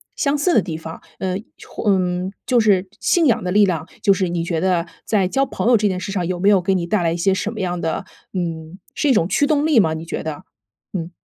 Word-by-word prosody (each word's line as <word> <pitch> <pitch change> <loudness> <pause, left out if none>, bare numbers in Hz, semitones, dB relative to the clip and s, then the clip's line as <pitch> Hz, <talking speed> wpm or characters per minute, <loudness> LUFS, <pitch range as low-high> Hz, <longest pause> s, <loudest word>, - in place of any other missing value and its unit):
相 285 +1 +1
似 345 +5 +2
的 220 - +5
地 165 -4 -5
方， 160 0 -9 0.2
呃， 185 -1 -1 0.3
或 215 - -2
嗯， 180 0 0
就 245 -2 +3
是 195 -3 +3
信 345 -2 +3
仰 245 -6 +2
的 180 - -2
力 205 +2 +5
量， 170 -4 -1 0.2
就 200 - +5
是 185 -2 -1
你 170 -1 -2
觉 170 -2 -1
得 180 -2 +1 0.2
在 200 -4 +1
交 270 +8 +1
朋 230 - -3
友 245 - +6
这 210 -2 +2
件 185 -1 -2
事 195 +1 -5
上， 180 -3 -1
有 180 0 -2
没 195 - +1
有 200 -3 +5
给 190 +2 +1
你 175 -2 -1
带 200 -1 +1
来 165 - +1
一 170 - -2
些 190 +3 +2
什 200 +2 -2
么 225 - -7
样 180 -2 -2
的 165 +4 -2 0.3
嗯， 165 -1 -4 0.2
是 295 - +1
一 - - +6
种 170 -7 +2
驱 200 +9 +2
动 295 0 +2
力 305 -5 +3
吗？ 160 -4 +1
你 160 +1 -6
觉 - - -4
得， 155 -2 -5 0.5
嗯。 175 -2 -4
185 Hz, 285 characters per minute, -20 LUFS, 170-210 Hz, 0.5 s, 友